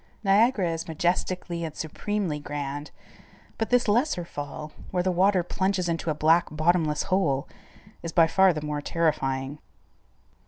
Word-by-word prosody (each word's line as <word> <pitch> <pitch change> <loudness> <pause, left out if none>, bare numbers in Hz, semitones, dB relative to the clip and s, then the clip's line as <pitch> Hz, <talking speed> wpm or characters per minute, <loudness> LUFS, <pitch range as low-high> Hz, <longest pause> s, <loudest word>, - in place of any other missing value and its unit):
Niagara 200 -2 +3
is 165 0 -4
majestically 175 +1 -1
and 160 -2 -5
supremely 170 0 -3
grand, 145 0 -5 0.7
but 225 - -1
this 245 -1 +3
lesser 210 - +1
fall, 150 0 -7 0.2
where 180 -1 0
the 185 - +1
water 185 +1 +3
plunges 190 0 -1
into 165 0 -2
a 155 - 0
black 160 +3 +4
bottomless 155 -1 +1
hole, 170 -8 +1 0.5
is 165 - -5
by 165 -1 +5
far 190 +3 +4
the 155 -3 -4
more 150 -1 -2
terrifying. 145 -4 -1
170 Hz, 145 wpm, -26 LUFS, 150-185 Hz, 0.7 s, by